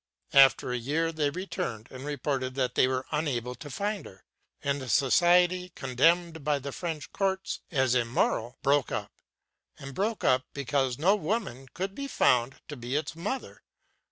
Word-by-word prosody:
After 135 -2 +6
a 125 - 0
year 155 +7 0
they 155 -3 0
returned 170 - -4
and 130 0 -8
reported 135 -2 -2
that 130 -2 0
they - - +4
were 130 0 -1
unable 130 -6 -1
to 145 +3 -10
find 205 +7 -3
her; 95 - -16 0.4
and 140 0 0
the 130 - -6
society, 175 +7 +4
condemned 160 +5 +2
by 150 0 +2
the 140 0 -6
French 160 -2 -5
courts 190 -1 -1
as 130 -6 +2
immoral, 120 -1 0
broke 140 -1 +2
up, - - -3 0.7
and 135 0 -8
broke 215 - -1
up 130 0 +3
because 135 -2 0
no 185 +7 +4
woman 175 - -3
could 190 +2 -3
be 280 +5 -5
found 125 - +2
to 150 - -6
be 125 +1 -4
its 155 +2 -2
mother. 205 +11 -5
145 Hz, 165 wpm, -28 LUFS, 130-175 Hz, 0.7 s, After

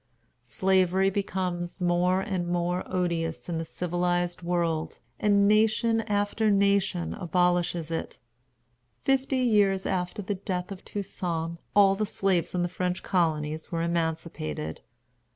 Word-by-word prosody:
Slavery 185 +10 +2
becomes 185 -3 -2
more 180 +1 +2
and 190 -4 -2
more 175 +1 0
odious 170 -3 -2
in 170 -2 -2
the 165 - -3
civilized 175 +1 -1
world, 170 -2 -1 0.2
and 200 -1 +4
nation 220 +2 +3
after 205 +1 +1
nation 200 -3 +2
abolishes 175 -2 0
it. 165 - -4 0.9
Fifty 270 0 +1
years 205 -6 +3
after 185 +2 -2
the 205 - -2
death 185 -1 -4
of 190 - -8
Toussaint 170 -4 -4 0.2
all 200 -1 +6
the 210 +2 -1
slaves 190 -4 0
in 175 - +1
the - - +1
French 180 0 -2
colonies 155 -4 0
were 165 -1 -1
emancipated. 160 - -2
180 Hz, 125 wpm, -27 LUFS, 170-195 Hz, 0.9 s, all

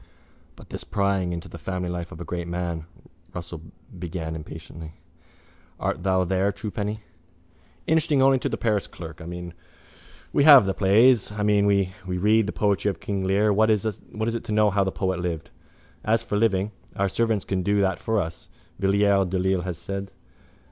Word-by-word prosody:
—But - - -15
this - - -5
prying 100 -3 0
into 85 -1 -5
the - - -10
family 90 -1 -3
life 85 -1 -4
of 80 - -9
a 85 - -6
great 85 -1 -4
man, 85 -2 -3 0.5
Russell 85 -2 -6 0.4
began 80 -2 -4
impatiently. 80 0 -9 0.9
Art - - -2
thou 95 0 +2
there, 95 +2 +1
truepenny? 105 +1 -4 0.8
—Interesting 160 -2 +2
only 135 0 +5
to - - -2
the - - -2
parish 105 -4 0
clerk. 80 0 -10
I 80 - -8
mean, 90 0 -6 0.8
we 145 - +4
have 140 -7 +9
the 95 - 0
plays. 110 +4 +4
I 105 0 -3
mean 105 -1 +3
when 100 -1 +3 0.2
we 90 0 -2
read 105 +3 +3
the - - -1
poetry 100 -1 +1
of 95 - -4
King 100 -2 -3
Lear 100 +2 +3
what 110 +2 +3
is 110 -1 +2
it 110 +2 -3
to 105 0 +2
us 100 - 0
how 100 0 +3
the 95 - -1
poet 95 -1 -1
lived? 85 -2 -4 0.5
As 110 +1 +2
for - - -3
living 105 -2 +2 0.2
our 100 - +1
servants 110 0 0
can 95 -1 -1
do 100 +2 +1
that 95 -3 +1
for 110 -1 0
us, 80 -3 -5 0.3
Villiers 100 0 +3
de 95 +1 -1
l'Isle 95 0 +1
has 90 -2 -4
said. 100 +3 -5
95 Hz, 185 wpm, -25 LUFS, 90-105 Hz, 0.9 s, have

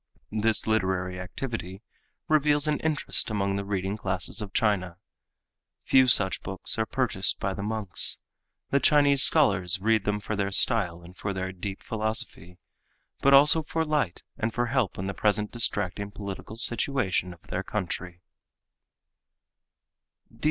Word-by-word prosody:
This 110 +1 +1
literary 95 -4 -1
activity 95 0 -6 0.4
reveals 150 -1 +2
an 150 -1 0
interest 155 -6 0
among 100 -2 -1
the 100 - -3
reading 100 0 -3
classes 95 +2 -3
of 100 -2 -6
China. 95 -6 0 0.9
Few 130 -1 +4
such 100 -6 +5
books 95 +4 -2
are 110 - 0
purchased 120 -7 0
by 95 0 -2
the 100 - -6
monks. 105 -2 +1 0.5
The 140 - +3
Chinese 145 -2 +4
scholars 100 - +4
read 110 0 +1
them 105 0 -1
for 105 +1 -4
their 100 -1 -1
style 95 -5 +2
and 90 +2 -14
for 100 +1 -4
their 95 0 -4
deep 95 +2 -7
philosophy, 110 -6 -3 0.6
but 140 0 +6
also 150 +3 +6
for 160 +1 -2
light 145 - -1 0.2
and 110 +1 -1
for 120 +2 -1
help 120 -4 -1
in 95 - -4
the 100 - -3
present 105 0 0
distracting 100 -4 0
political 100 +1 -8
situation 115 -6 0
of 85 -2 -15
their 90 - -4
country. 90 -3 -5
105 Hz, 145 wpm, -26 LUFS, 95-120 Hz, 0.9 s, but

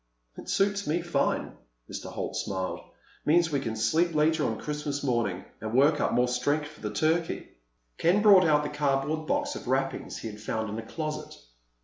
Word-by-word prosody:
"It - - -9
suits 200 0 +1
me 165 +3 0
fine." 170 -5 0 0.4
Mr. - - -6
Holt - - -4
smiled. 95 -1 -2 0.4
"Means 165 +1 +3
we 140 - +1
can 115 -5 -3
sleep 155 +10 +1
later 155 +1 +3
on 110 - -1
Christmas 150 -1 -3
morning—and 110 -3 -2
work 145 +3 +5
up - - +1
more 125 0 +3
strength 145 +4 0
for - - -16
the 105 - -2
turkey." 160 +9 0 0.5
Ken 185 +5 +3
brought 200 -3 +8
out 150 -2 +4
the 150 - -2
cardboard 145 +2 0
box 290 0 0
of - - -8
wrappings 135 +1 -1
he 115 - -5
had 105 +1 -11
found 110 -1 -2
in 110 - -4
a 110 - -8
closet. 155 -1 -5
150 Hz, 185 wpm, -28 LUFS, 120-160 Hz, 0.5 s, brought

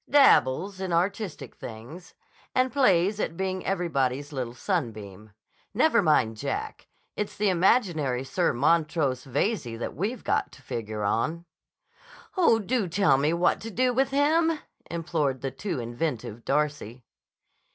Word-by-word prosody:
"Dabbles 195 - +4
in 190 -2 -3
artistic 190 +2 -2
things. 125 +11 -10 0.4
And 255 0 +2
plays 205 -7 +3
at 165 - -2
being 190 -1 -2
everybody's 145 -6 -1
little 125 -3 -4
sunbeam. 110 - -4 0.4
Never - - +4
mind 110 0 +2
Jack. - - -4 0.3
It's 210 - -4
the 210 -1 +2
imaginary 170 - +2
Sir 175 +6 0
Montrose 150 -1 +1
Veyze 135 - -1
that 120 - -4
we've 210 - -3
got - - 0
to 135 - -16
figure 110 -3 -4
on." 155 +11 -1 0.9
"Oh, 335 - +5
do 225 0 -1
tell 165 -6 +3
me 150 +3 +2
what 170 +1 +1
to 225 - -6
do 250 +3 +1
with 265 +2 +2
him!" 315 +4 +2 0.3
implored 155 -6 -1
the 135 - -3
too 160 +3 -4
inventive 120 -2 -4
Darcy. 140 -5 -1
165 Hz, 135 wpm, -27 LUFS, 130-200 Hz, 0.9 s, Oh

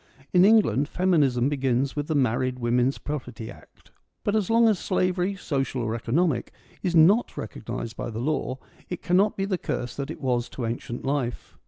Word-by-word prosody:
In 180 0 +6
England 160 - +4
feminism 145 -9 +2
begins 135 -2 0
with 145 0 -2
the 155 - -1
Married 130 -1 +1
Women's 125 +2 +1
Pro 150 0 -3
perty 120 -3 -9
Act. - - -18 0.3
But 205 - 0
as 210 -4 0
long 230 0 +5
as 210 -5 +2
slavery, 185 0 0
social 135 -8 -2
or 110 -1 -1
economic, 125 +4 0 0.3
is 180 -2 -1
not 190 +9 +5
recognised 115 -1 -5
by - - -4
the 110 - -6
law, 130 0 -1 0.3
it 180 - -5
cannot 195 +4 +2
be 195 - 0
the 190 -3 -1
curse 125 -4 -3
that 140 0 -4
it 160 - -6
was 125 -4 0
to 125 - -5
ancient 120 +2 -4
life. 135 -3 -2
140 Hz, 185 wpm, -25 LUFS, 125-180 Hz, 0.3 s, In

